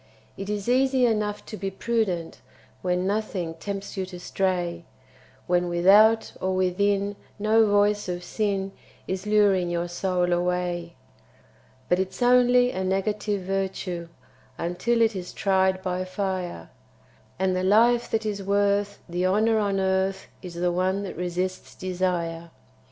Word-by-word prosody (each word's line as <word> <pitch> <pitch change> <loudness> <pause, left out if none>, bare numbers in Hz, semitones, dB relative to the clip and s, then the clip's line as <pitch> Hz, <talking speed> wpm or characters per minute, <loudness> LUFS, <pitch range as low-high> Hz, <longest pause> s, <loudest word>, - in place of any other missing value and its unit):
It 195 +1 -6
is 210 0 -3
easy 260 +1 +3
enough 210 -3 -1
to - - -7
be 195 -1 -3
prudent 195 -5 -2 0.4
When 180 0 0
nothing 195 -5 -2
tempts 195 +5 -6
you 190 -2 -3
to 180 -1 -9
stray, 175 -2 -1 0.6
When 175 0 +1
without 205 +6 +5
or 190 0 0
within 200 +2 +1 0.2
no 215 +1 +4
voice 205 -1 +2
of 175 0 -4
sin 195 0 -1 0.4
Is 190 +2 -4
luring 200 -4 +3
your 175 0 -1
soul 180 0 0
away; 175 -1 -1 0.9
But 180 - +2
it's 190 +6 -2
only 245 0 +5
a 190 - -3
negative 200 +2 -1
virtue 185 -2 -3 0.5
Until 230 +8 +1
it 220 -2 +1
is 180 -1 -6
tried 190 -1 +1
by 185 -1 -1
fire, 185 - -4 0.7
And 185 0 +1
the 185 - 0
life 235 +5 +4
that 220 0 -1
is 205 -2 -2
worth 200 +1 +1
the 175 +1 0
honour 220 +3 +3
on 200 -2 0
earth 190 0 0 0.2
Is 180 -3 -8
the 175 +1 0
one 185 +3 0
that 195 - -6
resists 180 +1 -3
desire. 175 -2 -2
190 Hz, 140 wpm, -25 LUFS, 180-205 Hz, 0.9 s, without